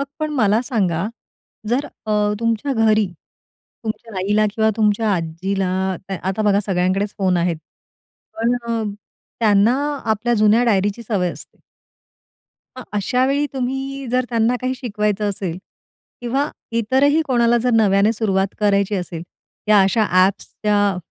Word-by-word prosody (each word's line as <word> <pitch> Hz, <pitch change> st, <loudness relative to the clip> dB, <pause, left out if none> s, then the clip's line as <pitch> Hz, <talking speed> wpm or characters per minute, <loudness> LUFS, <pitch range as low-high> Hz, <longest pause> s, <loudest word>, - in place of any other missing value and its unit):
मग 280 Hz, -, -2 dB
पण 310 Hz, 0 st, -2 dB
मला 220 Hz, -3 st, +3 dB
सांगा, 195 Hz, -, -1 dB, 0.6 s
जर 260 Hz, +5 st, +1 dB
अ, 210 Hz, -1 st, -1 dB
तुमच्या 230 Hz, +4 st, 0 dB
घरी 220 Hz, -3 st, +3 dB, 0.8 s
तुमच्या 220 Hz, -1 st, -5 dB
आईला 210 Hz, +3 st, +2 dB
किंवा 220 Hz, -1 st, +2 dB
तुमच्या 215 Hz, 0 st, +2 dB
आजीला, 180 Hz, +3 st, -2 dB, 0.5 s
आता 195 Hz, +3 st, -1 dB
बघा 205 Hz, -1 st, +3 dB
सगळ्यांकडेच 190 Hz, +2 st, 0 dB
फोन 185 Hz, -2 st, +2 dB
आहेत, 170 Hz, -1 st, 0 dB, 0.8 s
पण 235 Hz, +2 st, +2 dB
अ, 230 Hz, -1 st, -1 dB, 0.6 s
त्यांना 215 Hz, +2 st, +4 dB, 0.3 s
आपल्या 235 Hz, +3 st, +1 dB
जुन्या 215 Hz, +2 st, +4 dB
डायरीची 205 Hz, 0 st, +1 dB
सवय 195 Hz, -5 st, -1 dB
असते. -, -, -14 dB, 1.2 s
मग -, -, -6 dB
अशावेळी 260 Hz, +8 st, +1 dB
तुम्ही 270 Hz, +1 st, -3 dB
जर 255 Hz, 0 st, +1 dB
त्यांना 230 Hz, +1 st, +1 dB
काही 255 Hz, +1 st, -1 dB
शिकवायचं 210 Hz, -4 st, -1 dB
असेल 185 Hz, -3 st, -4 dB, 0.6 s
किंवा 270 Hz, +5 st, -1 dB, 0.3 s
इतरही 280 Hz, +7 st, +3 dB
कोणाला 240 Hz, -2 st, +3 dB
जर 250 Hz, +1 st, 0 dB
नव्याने 205 Hz, 0 st, +4 dB
सुरुवात 195 Hz, -3 st, 0 dB
करायची 200 Hz, 0 st, +2 dB
असेल, 175 Hz, -3 st, -4 dB, 0.4 s
त्या 210 Hz, -2 st, +6 dB
अशा 215 Hz, +3 st, +2 dB, 0.2 s
ॲप्सच्या 205 Hz, 0 st, -1 dB
215 Hz, 130 wpm, -20 LUFS, 200-240 Hz, 1.2 s, त्या